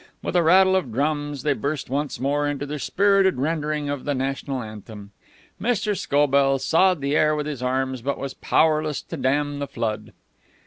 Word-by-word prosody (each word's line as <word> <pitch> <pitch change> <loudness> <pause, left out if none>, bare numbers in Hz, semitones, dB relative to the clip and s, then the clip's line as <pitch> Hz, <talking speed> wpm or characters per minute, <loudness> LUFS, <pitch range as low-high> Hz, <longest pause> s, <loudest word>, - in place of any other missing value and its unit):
With - - -3
a 175 - +5
rattle 190 +3 +5
of 155 -11 -1
drums 145 +1 -2
they 150 - +2
burst 140 +1 -3
once 145 +2 -3
more 145 +2 0
into 145 -1 -3
their 150 +1 -5
spirited 195 +4 +2
rendering 150 +1 -1
of 145 -2 -3
the 145 - -1
national 135 0 -3
anthem. 105 -1 -10 0.5
Mr. 210 -2 0
Scobell 140 -3 +2
sawed 165 +5 +2
the 140 +2 0
air 155 0 +3
with 150 -1 -2
his 145 -4 -5
arms, 130 0 -1
but 140 +3 -2
was 135 -1 -5
powerless 155 -3 +1
to - - -7
dam 145 +2 0
the 140 - -3
flood. 115 -5 -4
145 Hz, 180 wpm, -23 LUFS, 135-155 Hz, 0.5 s, a